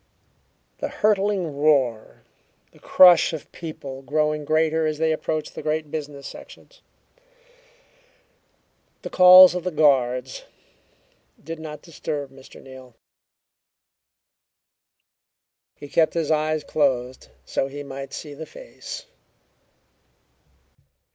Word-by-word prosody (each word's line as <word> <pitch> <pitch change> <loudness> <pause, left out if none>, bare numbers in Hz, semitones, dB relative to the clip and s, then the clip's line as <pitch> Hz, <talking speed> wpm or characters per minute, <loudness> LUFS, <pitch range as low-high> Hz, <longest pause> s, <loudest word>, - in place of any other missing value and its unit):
The - - -3
hurtling 200 -6 0
roar, 135 -7 0 0.5
the - - -22
crush 180 -3 +5
of 160 - -8
people 140 -5 -9
growing 150 +1 -1
greater 160 +1 +1
as 155 -1 -3
they 160 0 +1
approached 155 -1 -3
the - - -7
great 155 -1 -3
business 145 -2 -7
sections, - - -13 2.2
the - - -7
calls 185 0 +8
of 180 -1 -4
the 185 - -2
guards, 130 -5 +1 1.0
did 165 +2 -7
not 150 -2 -9
disturb 150 -4 -6
Mr. 135 0 -15
Neal. 130 -2 -14 2.8
He 145 - -11
kept 160 +2 +1
his 160 -2 -1
eyes 155 0 0
closed 130 -4 -1 0.2
so 135 - -2
he 145 +1 -8
might 135 0 -8
see 150 -2 -8
the 160 +2 -9
face. - - -10
155 Hz, 105 wpm, -23 LUFS, 140-160 Hz, 2.8 s, calls